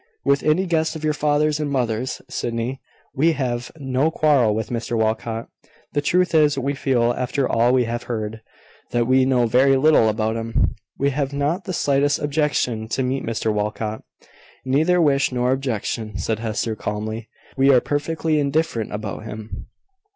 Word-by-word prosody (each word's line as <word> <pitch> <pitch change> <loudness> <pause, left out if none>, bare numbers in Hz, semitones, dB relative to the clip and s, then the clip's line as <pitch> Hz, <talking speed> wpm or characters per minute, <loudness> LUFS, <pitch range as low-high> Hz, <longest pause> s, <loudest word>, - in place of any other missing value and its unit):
"With 140 0 +3
any 155 +5 +2
guest 160 -2 0
of 160 - -7
your 155 0 +1
father's 150 0 +1
and 150 -1 -1
mother's, 125 -2 -2
Sydney. 120 +3 -3 0.3
We 160 +5 +3
have 125 -4 -3
no 135 +1 0
quarrel 140 -9 +3
with 110 +1 -3
Mr 120 0 -2
Walcot. 110 +1 -1 0.5
The 145 - +1
truth 175 +3 +1
is, 150 -3 +4
we 135 +1 -1
feel, 125 -4 +1
after 130 +2 -1
all 120 +2 +3
we 130 -1 +3
have 120 +1 -3
heard, 110 -1 -3 0.5
that 120 -1 +1
we 130 +1 +4
know 125 -2 +3
very 130 +4 +4
little 140 -5 +5
about 110 +1 -1
him. 115 0 0 0.2
We 140 +1 +1
have 140 0 -2
not 145 +7 -1
the - - -4
slightest 145 -2 +2
objection 145 -7 0
to 130 +3 -1
meet 130 +2 -1
Mr 110 -1 -1
Walcot." 105 +1 -3 0.6
"Neither 155 +7 +3
wish 140 -5 +3
nor 125 0 +1
objection," 115 -4 -2
said 110 -1 -2
Hester, 110 0 -2
calmly. 110 +2 -4 0.3
"We 135 0 +5
are 130 - +6
perfectly 155 +3 -1
indifferent 140 -5 0
about 105 0 -5
him." 105 -3 -8
130 Hz, 165 wpm, -22 LUFS, 115-145 Hz, 0.6 s, are